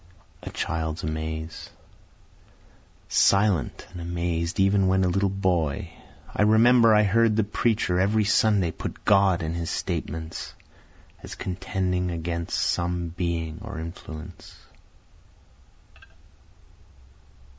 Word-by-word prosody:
A - - -7
Child's 80 -1 -3
Amaze 80 +1 -5 1.4
Silent 100 -5 +2
and 90 -1 -8
amazed 85 +1 -2
even 95 0 +3
when 95 0 +3
a - - +2
little 100 +2 +1
boy, 90 -6 -1 0.4
I - - 0
remember 115 +2 +6
I 105 - +5
heard 110 +2 +3
the 110 - +3
preacher 105 -3 0
every 105 +3 +2
Sunday 105 -4 +3
put - - -7
God 95 -4 +4
in 80 +1 -2
his 85 -1 -3
statements, 80 +1 -4 0.7
As - - -8
contending 90 -1 -2
against 85 0 -3
some 85 -1 -1
being 85 -2 -3
or - - -7
influence. 80 +1 -9
90 Hz, 105 wpm, -25 LUFS, 85-100 Hz, 1.4 s, remember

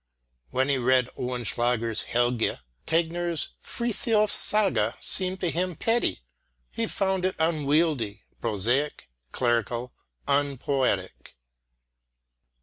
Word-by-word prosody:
When 130 +1 0
he 140 -2 +2
read 125 0 +3
Oehlenschläger's 120 -2 0
Helge, 120 -1 0 0.3
Tegner's 170 0 0
Frithiof's 225 -2 +1
Saga 195 - +3
seemed 185 0 -2
to 175 - +1
him 180 +1 -1
petty; 225 - 0 0.5
he - - -2
found 190 -1 -1
it 185 0 0
unwieldy, 150 -8 +1 0.2
prosaic, 115 - 0 0.2
clerical, 120 0 -1 0.3
unpoetic. 135 - -1
140 Hz, 90 wpm, -26 LUFS, 120-175 Hz, 0.5 s, read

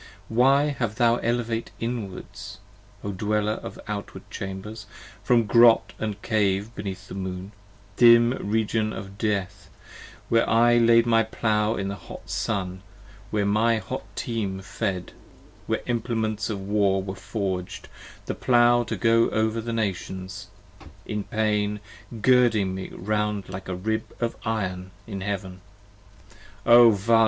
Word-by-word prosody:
10 110 - -7
Why 135 +3 +5 0.2
have 115 -3 -1
thou 120 0 +3
elevate 115 -1 -1
inward, 115 -6 -4 0.8
O 100 - -3
dweller 105 +2 -1
of - - -8
outward 105 -1 -6
chambers, 100 +2 -6 0.4
From 120 +2 +4
grot 115 +1 +5 0.2
& 105 -1 -8
cave 105 0 0
beneath 100 -1 -6
the - - -9
Moon, 95 0 -5 0.5
dim 120 0 +7 0.2
region 110 0 0
of 100 -1 -8
death, 100 -2 -2 0.6
Where 115 0 +2
I 120 +1 +5
laid 115 0 +5
my 115 -1 +4
Plow 110 0 0
in 95 - -3
the - - -3
hot - - -8
noon, 95 -1 -2 0.5
where 105 -1 0
my 110 +3 +3
hot 100 - -5
team 100 -5 -3
fed, 90 -1 -3 0.6
Where - - -1
implements 110 -3 -1
of 100 -3 -4
War 100 -2 +2
are 95 - -4
forged, 95 -5 -4 0.4
the - - -2
Plow 120 -1 +4
to 110 - -4
go 115 0 +3
over 110 +1 0
the 115 +1 -4
Nations, 100 -2 -4 0.6
In 105 -1 -3
pain 105 -1 0 0.4
girding 120 -7 +4
me 95 0 -5
round 105 0 -2
like 95 0 -7
a 95 - -2
rib 110 +4 -3
of 115 -1 -1
iron 95 -5 -2 0.2
in 100 -3 -6
heaven: 95 -2 -4 1.0
O 120 0 +8
Vala! 115 +2 +3
105 Hz, 140 wpm, -25 LUFS, 95-115 Hz, 1.0 s, O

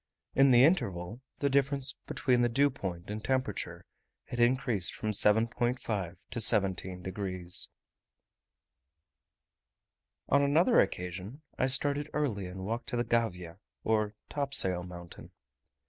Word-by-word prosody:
In 135 0 +5
the 125 -1 +6
interval, 115 - 0 0.2
the 140 - 0
difference 140 0 0
between 125 -3 +1
the 120 - +2
dew 140 +4 +3
point 95 -7 -6
and 105 0 -5
temperature 130 0 -2 0.4
had 120 - -7
increased 120 -6 +1
from 110 - -2
7.5 110 -3 +1 0.2
to 120 - -3
17 95 -3 +1
degs. 95 -2 -2 2.6
On 140 - +3
another 160 - +4
occasion 95 - -2 0.2
I 130 - +3
started 145 +2 +3
early 115 -11 -1
and 95 +1 -7
walked 115 +3 -4
to 120 - -3
the 120 - +1
Gavia, 90 -7 -2 0.2
or 110 -1 0
topsail 140 -11 +3
mountain. 90 -1 -10
115 Hz, 120 wpm, -30 LUFS, 95-135 Hz, 2.6 s, the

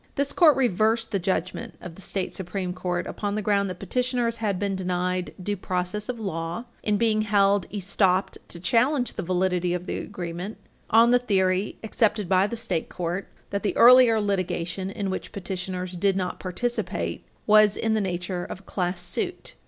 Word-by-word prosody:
This 280 0 0
Court 315 -5 +6
reversed 225 -2 +2
the 200 - +1
judgment 185 0 -2
of 180 - -9
the 195 - -13
state 190 0 -3
Supreme 185 -1 -3
Court 180 -1 -2
upon 205 -1 -3
the 215 - -1
ground 200 -1 +2
that 180 - -6
petitioners 245 +3 -1
had 210 -4 -1
been 200 0 -1
denied 180 -1 -1
due 205 +3 -2
process 185 +3 -3
of 245 -2 -3
law 170 +1 -4 0.2
in 210 -1 +1
being 215 -1 +2
held 200 -2 +2
estopped 195 -1 +1
to 170 - -7
challenge 245 - +2
the - - -4
validity 180 0 0
of 180 0 -5
the - - -3
agreement 180 +1 -6 0.3
on 230 +2 +6
the 245 - +5
theory, 190 -4 +1
accepted 215 -2 +1
by 190 +2 +3
the 235 - -4
state 225 -8 -1
court, 180 +2 -3 0.2
that 200 0 -1
the 205 - -1
earlier 245 -2 +8
litigation, 185 -2 -2
in 195 -1 -3
which 190 - -5
petitioners 185 -2 -4
did 190 +2 +1
not 180 -1 -2
participate, 240 +7 -2 0.2
was 215 -1 +5
in 225 -1 0
the 220 - +1
nature 180 -1 -3
of 185 - -7
a - - -26
class 180 -1 -2
suit. - - -3
195 Hz, 180 wpm, -25 LUFS, 180-215 Hz, 0.3 s, earlier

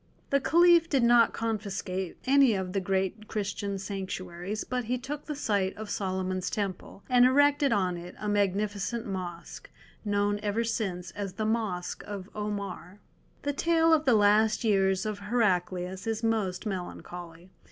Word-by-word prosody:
The 280 - +4
Caliph 340 +1 +5
did 270 -4 +2
not 235 -1 +6
confiscate 195 -4 -3
any 270 -4 +5
of 185 -1 -3
the 195 - +1
great 190 +3 -1
Christian 200 -1 -3
sanctuaries, 190 0 -5
but 250 -1 -3
he 250 +3 0
took 285 +4 -6
the 300 - -4
site 200 -8 0
of 215 -1 -6
Solomon's 185 -1 -2
Temple, 195 -1 -4
and 250 -1 +5
erected 285 +2 +4
on 185 -5 +1
it 175 +1 -9
a 210 - -5
magnificent 205 +2 0
Mosque, 180 -4 -6 0.3
known 205 0 +1
ever 210 +2 0
since 190 -6 -3
as 195 0 -5
the 215 +3 -3
Mosque 215 -5 -2
of 200 -2 -7
Omar. 200 -2 -5 0.4
The 285 - -1
tale 330 +2 +3
of 310 -1 +3
the 250 - +5
last 215 +2 +4
years 195 -3 +2
of 215 -1 -3
Heraclius 190 -3 0
is 225 0 -2
most 215 -4 0
melancholy. 175 -2 -7
205 Hz, 150 wpm, -28 LUFS, 190-230 Hz, 0.4 s, not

